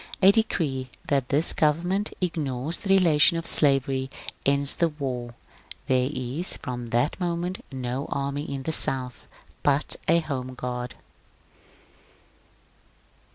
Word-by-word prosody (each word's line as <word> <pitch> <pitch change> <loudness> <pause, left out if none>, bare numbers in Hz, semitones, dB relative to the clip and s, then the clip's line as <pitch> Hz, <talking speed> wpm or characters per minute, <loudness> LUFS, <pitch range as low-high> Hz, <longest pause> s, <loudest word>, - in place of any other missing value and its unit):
A 195 +1 +7
decree 150 - -1 0.2
that 135 -3 +1
this 150 +4 +3
govern 160 +3 +1
ment 200 +3 0
ignores 155 -3 -1
the 200 - -6
relation 165 -2 +5
of 165 - -4
slavery 135 -2 +2 0.4
ends 140 0 +2
the 170 - +2
war. 125 -5 -5 0.5
There 130 0 +2
is 135 +6 -2
from 120 -1 -6
that 120 +9 0
moment 175 +1 -2
no 130 +1 -4
army 140 +2 -3
in 135 -1 -4
the 160 - -2
South, 130 -5 +2 0.3
but 145 0 +2
a 165 - +5
home 130 -5 -4
guard. 125 -1 -5
140 Hz, 125 wpm, -25 LUFS, 130-165 Hz, 0.5 s, A